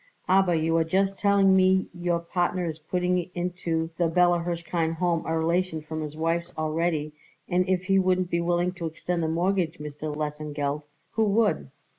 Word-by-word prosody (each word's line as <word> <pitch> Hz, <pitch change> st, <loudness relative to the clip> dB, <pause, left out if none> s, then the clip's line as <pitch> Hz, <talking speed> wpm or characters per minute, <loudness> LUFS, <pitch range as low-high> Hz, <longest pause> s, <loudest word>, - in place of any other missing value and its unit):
"Aber 185 Hz, -2 st, +4 dB
you 160 Hz, +1 st, +1 dB
are 165 Hz, -, +3 dB
just 195 Hz, +4 st, 0 dB
telling 200 Hz, -2 st, +4 dB
me 190 Hz, 0 st, +4 dB
your 175 Hz, 0 st, 0 dB
partner 175 Hz, +1 st, -1 dB
is 160 Hz, -1 st, -4 dB
putting 180 Hz, +2 st, -1 dB
into 175 Hz, -2 st, -2 dB
the 170 Hz, -, +3 dB
Bella 175 Hz, +1 st, +3 dB
Hirshkind 170 Hz, -1 st, -2 dB
Home 170 Hz, -1 st, 0 dB
a 160 Hz, 0 st, 0 dB
relation 170 Hz, +1 st, 0 dB
from 155 Hz, +1 st, -6 dB
his 155 Hz, 0 st, -6 dB
wife's 170 Hz, +2 st, -1 dB
already, 155 Hz, -1 st, -1 dB, 0.3 s
and 180 Hz, +1 st, +1 dB
if 185 Hz, -1 st, +1 dB
he 195 Hz, 0 st, +3 dB
wouldn't 185 Hz, -1 st, +1 dB
be 170 Hz, -, +1 dB
willing 175 Hz, +1 st, +1 dB
to 175 Hz, -2 st, -5 dB
extend 170 Hz, +2 st, -3 dB
the 160 Hz, -, 0 dB
mortgage, 170 Hz, +1 st, 0 dB
Mr. 150 Hz, 0 st, -6 dB
Lesengeld, 150 Hz, -1 st, -3 dB, 0.3 s
who 220 Hz, 0 st, +1 dB
would? 205 Hz, -, +1 dB
170 Hz, 175 wpm, -26 LUFS, 160-180 Hz, 0.3 s, Aber